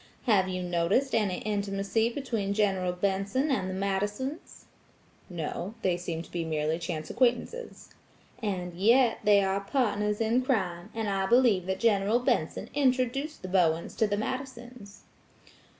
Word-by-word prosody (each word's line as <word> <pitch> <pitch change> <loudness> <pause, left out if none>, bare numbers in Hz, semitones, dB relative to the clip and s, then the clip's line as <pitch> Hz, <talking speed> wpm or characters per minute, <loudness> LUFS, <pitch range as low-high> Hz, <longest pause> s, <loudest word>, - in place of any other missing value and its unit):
Have 200 -6 +3
you 185 0 -3
noticed 180 +10 +1
any 205 -5 +1
intimacy 200 +2 0
between 230 -6 -2
General 190 -4 +1
Benson 200 +9 0
and 190 -8 0
the - - -3
Madisons?" 205 - -3 0.6
"No; 175 +4 -4
they 185 -2 +2
seem 170 -2 -4
to - - -16
be 170 -1 -2
merely 155 0 -1
chance 165 -2 -4
acquaintances." 255 - -1 0.5
"And 185 -5 -3
yet, 230 +7 +4
they 205 -1 +5
are 195 0 0
partners 210 -2 0
in 230 +3 +2
crime, 190 -8 -1
and 225 -1 -2
I 195 -1 0
believe 230 -6 +4
that 190 0 -2
General 210 -1 +3
Benson 250 - -1
introduced 270 +1 0
the - - -4
Bowens 170 -3 +1
to 220 - +3
the 205 0 -1
Madisons." 245 -3 -6
200 Hz, 145 wpm, -28 LUFS, 185-240 Hz, 0.6 s, they